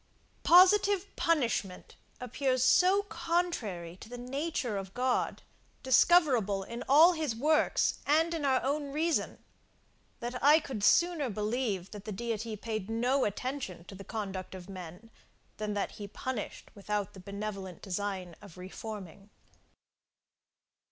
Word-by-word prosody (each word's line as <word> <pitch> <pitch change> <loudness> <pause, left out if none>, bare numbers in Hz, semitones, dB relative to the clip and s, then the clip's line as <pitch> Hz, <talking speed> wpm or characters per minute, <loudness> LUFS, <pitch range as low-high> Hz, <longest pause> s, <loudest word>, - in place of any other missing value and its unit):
Positive 385 +2 +5
punishment 235 - -1 0.2
appears 255 +1 0
so 375 +8 +5
contrary 335 - -2
to 220 - -12
the 245 - -7
nature 255 -1 -3
of 195 -1 -6
God, 250 0 0 0.4
discoverable 255 - +4
in 235 +5 -6
all 320 +6 +7
his 310 -8 -2
works, 300 +6 +2
and 320 +3 +3
in 325 -3 -3
our 265 -2 +2
own 285 +1 -1
reason, 320 +3 0 0.8
that 245 0 -5
I 300 +3 +7
could 260 -9 -6
sooner 340 0 +3
believe 210 -2 -2
that 210 -1 -9
the 215 - -5
Deity 225 +1 -3
paid 215 -1 -5
no 245 +4 +1
attention 210 -4 -4
to 180 - -12
the 195 +1 -9
conduct 195 -4 -5
of 180 -1 -10
men, 185 +3 -10 0.5
than 210 -1 -3
that 200 - -1
he 205 - -8
punished 235 +2 -6
without 205 -1 -3
the 190 - -11
benevolent 195 -1 -6
design 190 -3 -4
of 190 -4 -13
reforming. 195 0 -8
230 Hz, 130 wpm, -30 LUFS, 200-290 Hz, 0.8 s, all